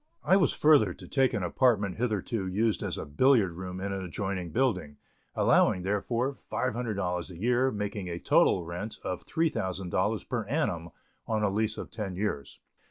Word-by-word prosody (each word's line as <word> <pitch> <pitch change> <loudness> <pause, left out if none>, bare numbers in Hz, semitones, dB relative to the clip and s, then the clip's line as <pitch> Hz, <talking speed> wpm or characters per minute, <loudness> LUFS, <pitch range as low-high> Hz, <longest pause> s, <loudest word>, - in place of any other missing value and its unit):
I 190 - +4
was 190 -2 +4
further 140 - +4
to - - -12
take 135 -2 +2
an 105 -5 -2
apartment 105 -1 +2
hitherto 110 -3 -1
used 105 +4 0
as - - -2
a - - -4
billiard 105 - +3
room 90 +2 -6
in 100 +1 -3
an 95 -1 -3
adjoining 95 0 -3
building, 95 - 0 0.4
allowing 90 - +3
therefor, 115 +7 -1
$500 105 -11 -2
a 85 -2 -10
year, 125 +4 +2
making 105 -4 -4
a 85 - -3
total 85 0 +3
rent 90 +6 -5
of 90 - -4
$3,000 95 - -1
per 120 -3 -2
annum, 100 - -1 0.4
on 110 -1 0
a 100 - +2
lease 110 +2 0
of - - -7
ten 100 -5 -4
years. 90 -8 -3
100 Hz, 165 wpm, -29 LUFS, 90-120 Hz, 0.4 s, I